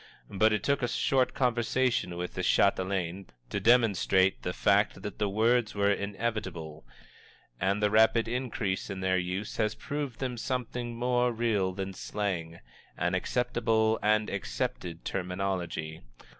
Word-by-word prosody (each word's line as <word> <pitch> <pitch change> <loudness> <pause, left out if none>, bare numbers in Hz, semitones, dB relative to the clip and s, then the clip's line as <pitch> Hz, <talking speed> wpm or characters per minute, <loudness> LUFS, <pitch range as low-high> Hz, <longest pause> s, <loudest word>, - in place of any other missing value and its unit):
But 110 +3 +3
it 105 -2 0
took 140 -1 +2
but 120 - -1
a - - -3
short 130 -2 +2
conversation 120 -6 +1
with 90 0 -4
the 90 - -3
Chatelaine 95 -1 +1 0.2
to - - -1
demonstrate 100 -5 +3
the - - -2
fact - - +2
that - - -6
the 105 -1 +1
words 115 +2 +2
were 100 0 +3
inevitable, 100 -7 -3 0.8
and 100 +2 0
the 105 - +3
rapid 110 +1 +4
increase 115 -5 -2
in 95 -1 -5
their 95 0 +2
use 90 +4 -4
has 110 -1 0
proved 145 -5 -4
them 125 -2 -3
something 120 -1 -3
more 125 +1 +1
real 110 -5 0
than 95 +1 -5
slang 90 -5 -3 0.4
an 90 +1 0
acceptable 110 +1 +1
and 105 0 +2
accepted 100 -4 -4
terminology. 90 -4 -3
105 Hz, 145 wpm, -29 LUFS, 95-120 Hz, 0.8 s, rapid